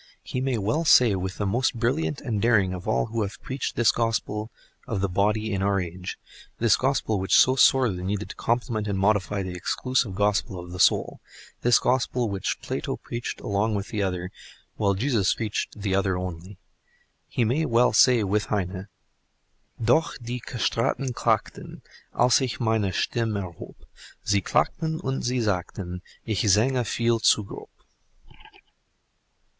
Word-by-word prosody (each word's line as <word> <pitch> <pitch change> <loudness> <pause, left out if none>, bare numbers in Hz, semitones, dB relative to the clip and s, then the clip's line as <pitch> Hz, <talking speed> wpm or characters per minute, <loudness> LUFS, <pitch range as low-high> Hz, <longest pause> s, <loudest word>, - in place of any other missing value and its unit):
He 125 - -4
may 130 -2 0
well 110 +11 0
say 125 -8 +6
with 95 0 -3
the 105 - -1
most 120 +6 +1
brilliant 135 +6 -1
and 115 -7 -2
daring 105 -6 +3
of 90 +2 -7
all 110 - +1
who 115 0 -3
have 100 0 -4
preached 135 -2 -4
this 120 -3 +4
Gospel 110 -2 -2 0.4
of 110 - -2
the 100 - +1
body 105 +3 0
in 95 - -1
our 100 0 +2
age 90 0 -6 0.4
(this 115 -1 +4
Gospel 130 -6 0
which 95 - -2
is - - +8
so 130 - +5
sorely 125 -8 +4
needed 100 +2 -3
to - - -11
complement 115 -2 -1
and 100 -1 -1
modify 100 0 +1
the 90 -1 -5
exclusive 110 +3 -1
Gospel 100 -1 0
of 85 0 -9
the 90 - -7
soul—this 120 +5 +1
Gospel 125 -2 0
which 100 -1 -2
Plato - - -3
preached 120 0 -6
along 105 +2 0
with 100 0 -4
the 105 -3 -2
other, 90 -2 -2 0.4
while 100 -2 +1
Jesus 110 -2 +1
preached 110 -1 -3
the 100 -2 -1
other 95 -1 +1
only), 90 +1 -6 0.7
he 120 - 0
may 135 +9 +1
well 120 +1 +3
say 125 -4 +5
with 105 +2 0
Heine 95 -1 -3 0.9
Doch 160 +8 +2
die 120 +1 -5
Castraten 125 +2 -1
Klagten, - - -2 0.3
Aïs 125 +2 +4
ich 125 -4 -2
meine 110 -4 +1
Stimm' 110 +3 -1
erhob; 90 -5 -7 0.5
Sie 100 -1 +2
Klagten 160 - 0
und 135 0 -2
sie 125 0 0
sagten; 90 -3 -3 0.2
Ich 110 -4 -1
sange 125 +6 +3
veil 115 +1 0
zu 110 - +4
grob. 100 - -10
110 Hz, 160 wpm, -25 LUFS, 95-120 Hz, 0.9 s, is